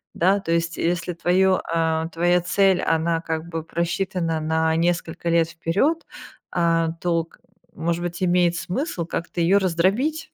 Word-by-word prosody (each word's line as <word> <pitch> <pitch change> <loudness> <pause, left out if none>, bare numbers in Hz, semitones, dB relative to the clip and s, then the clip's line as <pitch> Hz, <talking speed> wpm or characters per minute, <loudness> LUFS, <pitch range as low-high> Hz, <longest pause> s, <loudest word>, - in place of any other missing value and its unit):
Да, 190 +4 +3
то 165 - -4
есть 170 0 0
если 175 +1 -1
твоё, 185 +2 +2
а, 160 -1 0
твоя 175 +1 +2
цель 190 +1 +2
она 165 0 +1
как 160 0 -4
бы 165 -2 -4
просчитана 170 0 -2
на 160 +1 +1
несколько 170 0 -1
лет 165 -1 +3
вперед, 200 - 0 0.5
а, 165 -1 +1
то 170 -2 0
к, - - -24 0.4
может 170 +1 -1
быть, 175 +1 -4
имеет 175 -1 +3
смысл 180 - -3
как-то 170 +1 -5
ее 175 +4 +4
раздробить, 220 - 0
170 Hz, 150 wpm, -23 LUFS, 165-185 Hz, 0.5 s, ее